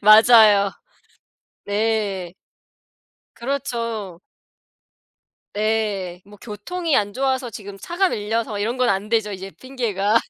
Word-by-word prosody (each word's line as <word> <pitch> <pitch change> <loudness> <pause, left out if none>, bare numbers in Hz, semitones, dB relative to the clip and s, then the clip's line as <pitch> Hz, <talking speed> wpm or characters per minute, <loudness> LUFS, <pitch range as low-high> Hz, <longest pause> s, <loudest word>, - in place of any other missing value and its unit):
맞아요. 215 -1 +7 1.0
네. 205 -4 -1 1.0
그렇죠. 230 -8 -3 1.4
예. 210 -4 -1
뭐 205 +1 -14
교통이 310 - -2
안 205 -1 +1
좋아서 260 -1 0
지금 200 -3 -9
차가 350 - 0
밀려서 220 -2 -2
이런 225 +5 -1
건 255 -1 +2
안 200 +2 -1
되죠 220 -2 +1
이제 190 0 -7
핑계가. 225 -5 -1
215 Hz, 200 characters per minute, -22 LUFS, 200-240 Hz, 1.4 s, 맞아요